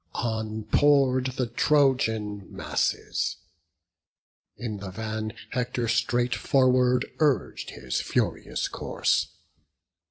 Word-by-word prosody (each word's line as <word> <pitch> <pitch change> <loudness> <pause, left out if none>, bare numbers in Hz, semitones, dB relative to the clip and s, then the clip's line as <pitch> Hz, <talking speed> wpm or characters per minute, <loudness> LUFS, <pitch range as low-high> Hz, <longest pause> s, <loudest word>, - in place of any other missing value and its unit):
On 110 -2 -2
pour'd 130 +1 +3
the 125 - +1
Trojan 115 -6 +1
masses; - - -1 1.2
in 110 -4 -4
the 100 -1 -7
van 110 +2 -4 0.2
Hector 125 -1 -1
straight 120 +2 +1
forward 125 -2 +3
urg'd 150 -4 +1
his 65 - -3
furious - - -1
course. - - 0
120 Hz, 90 wpm, -26 LUFS, 110-130 Hz, 1.2 s, pour'd